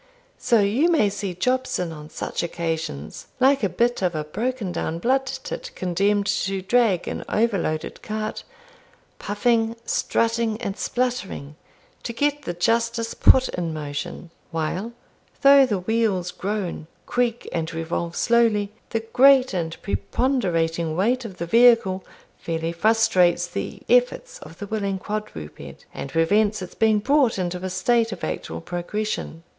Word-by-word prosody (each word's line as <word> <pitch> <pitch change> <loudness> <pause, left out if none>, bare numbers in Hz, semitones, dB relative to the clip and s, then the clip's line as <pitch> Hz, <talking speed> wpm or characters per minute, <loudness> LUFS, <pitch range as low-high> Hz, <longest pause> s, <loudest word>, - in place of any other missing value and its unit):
So 230 -3 +3
you 235 +12 +2
may 295 -12 +3
see 200 -3 -4
Jobson 255 -3 0
on 150 -1 -9
such - - -4
occasions, 160 - -4
like 270 0 +4
a 200 - +2
bit 235 +7 0
of 180 -3 0
a 155 - -1
broken 220 +5 -3
down 165 -1 -3
blood 265 +8 +1
tit - - -5
condemned 200 +3 +1
to 195 -1 -1
drag 215 -4 +2
an - - -4
overloaded 195 -8 -1
cart, 215 0 -4 0.8
puffing, 225 +2 +1
strutting, 230 -2 0
and 200 -5 -3
spluttering, 240 - -3 0.5
to 235 - -5
get 290 +4 0
the 175 -11 -5
Justice 230 +5 0
put 260 0 +5
in 170 -3 -3
motion, 150 +3 -6 0.2
while, 175 +8 -3 0.5
though 275 -1 +8
the 210 -5 0
wheels 190 -2 0
groan, 190 -5 -4 0.2
creak, 240 -1 -1
and 165 -1 -2
revolve 165 +1 -3
slowly, 225 -4 +2 0.2
the 225 - -1
great 260 +3 +5
and 165 -3 -3
preponderating 170 - 0
weight 240 +7 +1
of 195 -5 -8
the 170 - -3
vehicle 230 -2 +4 0.4
fairly 165 0 -2
frustrates 180 -2 +3
the 175 - -6
efforts - - +2
of - - -12
the 205 - -6
willing 200 -2 -2
quadruped, 205 - -7
and 135 - -6
prevents 205 +6 +2
its 180 - -9
being 220 -1 +3
brought 260 +1 +2
into 180 -1 -2
a 185 - -2
state 225 +5 +1
of - - -7
actual 80 +1 -4
progression. 175 -1 -4
205 Hz, 140 wpm, -23 LUFS, 175-235 Hz, 0.8 s, though